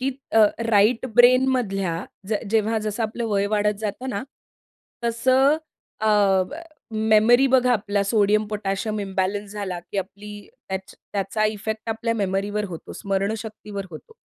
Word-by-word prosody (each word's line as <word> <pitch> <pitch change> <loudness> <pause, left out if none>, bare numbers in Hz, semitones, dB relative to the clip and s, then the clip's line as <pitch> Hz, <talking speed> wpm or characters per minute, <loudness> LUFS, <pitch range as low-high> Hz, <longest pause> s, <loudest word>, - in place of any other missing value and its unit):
की 260 - 0 0.2
अ, 225 -1 +7 0.3
राइट 225 +4 +4
ब्रेनमधल्या 240 -8 +3 0.2
ज 220 - 0 0.2
जेव्हा 220 0 +2
जसं 215 +2 -2
आपलं 225 +2 -3
वय 200 -1 +1
वाढत 210 0 +2
जातं 220 +4 -4
ना, 215 -4 -3 0.8
तसं 260 +5 +3 0.4
अ, 220 - +1 0.4
प 310 +4 -7 0.3
मेमरी 220 +4 +4
बघा 250 -1 +4
आपल्याला 205 -3 0
सोडियम, 210 0 +2
पोटॅशियम 210 +1 -2
इम्बॅलन्स 195 +1 -2
झाला 200 -4 -4
की 185 +3 -6
आपली 200 +2 -6 0.4
त्याच 190 0 -5 0.2
त्याचा 205 +2 -1
इफेक्ट 220 +1 -3
आपल्या 230 +1 -1
मेमरीवर 205 0 -1
होतो 165 -3 -8
स्मरणशक्तीवर 205 0 -3
होतो. 165 - -12
210 Hz, 135 wpm, -23 LUFS, 200-225 Hz, 0.8 s, अ